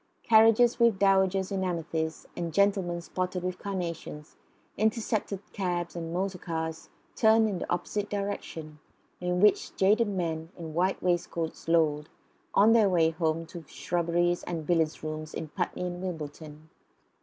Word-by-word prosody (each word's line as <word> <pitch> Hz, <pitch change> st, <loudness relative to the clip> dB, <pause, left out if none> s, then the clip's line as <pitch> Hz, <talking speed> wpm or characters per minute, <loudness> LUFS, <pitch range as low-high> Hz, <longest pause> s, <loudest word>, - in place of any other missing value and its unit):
Carriages, 225 Hz, +2 st, +5 dB
with 235 Hz, -4 st, +4 dB
dowagers 190 Hz, 0 st, +3 dB
in 190 Hz, -1 st, -1 dB
amethyst 165 Hz, -3 st, -3 dB
and 170 Hz, -1 st, -3 dB
gentlemen 190 Hz, -2 st, +1 dB
spotted 180 Hz, +1 st, -3 dB
with 185 Hz, 0 st, -3 dB
carnations, 170 Hz, -6 st, -5 dB, 0.4 s
intercepted 215 Hz, -2 st, -1 dB
cabs 175 Hz, -4 st, -2 dB
and 165 Hz, -1 st, -5 dB
motor 185 Hz, +1 st, -2 dB
cars 160 Hz, -1 st, -4 dB, 0.3 s
turned 220 Hz, 0 st, +5 dB
in 195 Hz, -4 st, -2 dB
the -, -, -5 dB
opposite 200 Hz, +4 st, -2 dB
direction, 195 Hz, -6 st, -5 dB, 0.4 s
in 180 Hz, 0 st, -1 dB
which 210 Hz, +1 st, +3 dB
jaded 210 Hz, +4 st, +3 dB
men 165 Hz, -5 st, -3 dB
in 160 Hz, -2 st, -7 dB
white 185 Hz, +4 st, 0 dB
waistcoats 175 Hz, -3 st, -2 dB
lolled, 155 Hz, -2 st, +2 dB, 0.5 s
on 215 Hz, +3 st, +6 dB
their 220 Hz, -4 st, +5 dB
way 165 Hz, -3 st, +3 dB
home 160 Hz, 0 st, -1 dB
to 170 Hz, 0 st, -9 dB
shrubberies 175 Hz, +4 st, 0 dB
and 165 Hz, -3 st, -4 dB
billiard 160 Hz, -2 st, +1 dB
rooms 155 Hz, 0 st, -5 dB
in 160 Hz, -, -5 dB
Putney 180 Hz, +2 st, -3 dB
and 180 Hz, 0 st, -4 dB
Wimbledon. 155 Hz, -3 st, -7 dB
175 Hz, 145 wpm, -28 LUFS, 160-195 Hz, 0.5 s, on